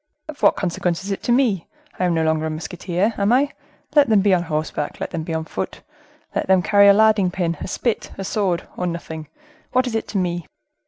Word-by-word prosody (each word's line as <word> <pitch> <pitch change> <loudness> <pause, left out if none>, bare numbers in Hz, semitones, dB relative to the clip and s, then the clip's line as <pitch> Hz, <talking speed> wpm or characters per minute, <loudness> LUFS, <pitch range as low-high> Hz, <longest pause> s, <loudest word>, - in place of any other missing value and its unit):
"Of 310 -2 -9
what - - +5
consequence 175 -1 -1
is 200 - -4
it 195 - -3
to - - -1
me? 240 -9 +2 0.3
I 185 - +2
am 175 -2 +1
no 160 - +1
longer 160 0 +1
a - - -2
musketeer, 180 +6 -2
am 200 +2 +2
I? 275 +4 +3 0.4
Let 290 -4 +5
them 215 -3 +5
be 200 -1 +3
on 180 - +3
horseback, 155 -3 -3
let - - -4
them 165 - -3
be 165 - -6
on 160 0 -2
foot, 185 - -5 0.5
let - - -1
them 190 -1 +4
carry 200 0 +5
a 200 - +9
larding 210 -2 +4
pin, 175 -3 -2
a - - -5
spit, 230 +4 -2
a 195 - -4
sword, 190 -3 -1
or 180 - -2
nothing—what 175 - -4
is 245 - -3
it 225 - -2
to 205 - -3
me?" 175 -3 -1
185 Hz, 225 wpm, -21 LUFS, 170-220 Hz, 0.5 s, a